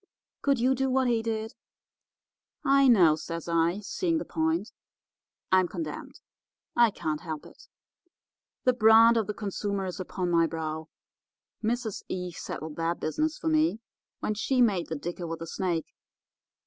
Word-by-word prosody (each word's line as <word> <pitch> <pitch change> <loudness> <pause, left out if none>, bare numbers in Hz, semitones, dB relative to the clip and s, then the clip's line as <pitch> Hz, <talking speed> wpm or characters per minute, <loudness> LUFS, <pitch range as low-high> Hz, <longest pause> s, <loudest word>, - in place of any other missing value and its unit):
Could 280 -1 +2
you 255 +3 +3
do 265 +1 0
what 260 0 +2
he 235 -2 +2
did?' 225 -1 -3 1.1
"'I 275 -1 +5
know,' 180 -11 +6
says 165 +1 -6
I, 170 +3 +1
seeing 330 - -1
the 315 - -3
point, 320 +1 -1 0.8
'I'm 185 -1 +5
condemned. 165 -4 -6 0.5
I 235 -1 +6
can't 155 -6 -3
help 155 -4 -6
it. 385 - -16 1.0
The 255 - +4
brand 225 0 +7
of 220 -3 +1
the 210 - -3
consumer 200 -1 -3
is 185 0 -5
upon 180 -1 -3
my 165 -1 +4
brow. 160 0 -4 0.7
Mrs. 225 -1 -1
Eve 180 -1 -4
settled 155 -1 -6
that 165 +1 -1
business 310 - -1
for - - -5
me 310 -6 +2 0.4
when 215 - 0
she 255 +5 0
made 205 -8 +3
the 160 - -3
dicker 175 +3 -5
with 165 0 -4
the 165 - -6
snake. 170 -2 -2
200 Hz, 155 wpm, -28 LUFS, 165-245 Hz, 1.1 s, brand